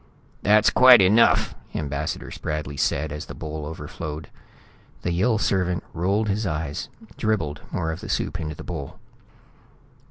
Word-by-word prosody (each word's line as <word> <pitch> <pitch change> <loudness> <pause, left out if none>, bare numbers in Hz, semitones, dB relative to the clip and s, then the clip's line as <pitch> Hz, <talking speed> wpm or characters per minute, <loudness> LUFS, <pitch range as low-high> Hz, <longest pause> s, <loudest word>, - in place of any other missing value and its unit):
"That's 105 +1 +5
quite 130 -2 +8
enough," 100 +5 +4 0.2
Ambassador 75 0 -3
Spradley 75 -2 -4
said, 75 +1 0
as 75 +1 -6
the - - -8
bowl 75 -1 -5
overflowed. 75 -1 -6 0.7
The 85 - 0
Yill 110 +7 +2
servant 90 -4 0
rolled 100 +6 +1
his 105 +1 0
eyes, 75 -3 -3 0.3
dribbled 90 -9 -1
more 80 -2 -1
of 80 - -5
the - - -8
soup - - -1
into 75 -1 -4
the - - -9
bowl. 70 - -6
80 Hz, 145 wpm, -24 LUFS, 75-100 Hz, 0.7 s, quite